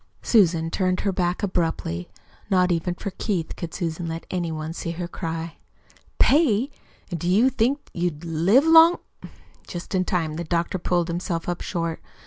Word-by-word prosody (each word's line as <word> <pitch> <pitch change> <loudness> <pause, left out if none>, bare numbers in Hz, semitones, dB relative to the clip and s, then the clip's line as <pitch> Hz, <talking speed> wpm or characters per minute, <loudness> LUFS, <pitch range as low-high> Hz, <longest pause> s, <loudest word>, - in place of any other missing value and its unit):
Susan 170 -7 +3
turned 185 -1 0
her 200 - 0
back 180 0 -1
abruptly. 165 - -1 0.4
Not 185 -1 +3
even 175 +1 -1
for 200 - -5
Keith 180 -5 -2
could 170 -2 -6
Susan 170 -1 -3
let 165 0 -5
any 175 -3 -1
one 155 0 -4
see 170 - -5
her 175 +1 -4
cry. 165 -1 -5 0.6
"Pay! 275 -3 +3 0.4
And 170 - -3
do 175 - -1
you 225 +8 +4
think 265 +4 0
you'd 170 -2 -2
live 175 - +3
long 325 +1 +8 0.3
" - - -27
Just 175 +2 -7
in 185 -1 +2
time 165 -4 -1
the 170 - -3
doctor 170 +2 -1
pulled 175 -1 0
himself 170 -1 -3
up 175 -1 -2
short. 165 -3 -3
175 Hz, 170 wpm, -24 LUFS, 165-195 Hz, 0.6 s, long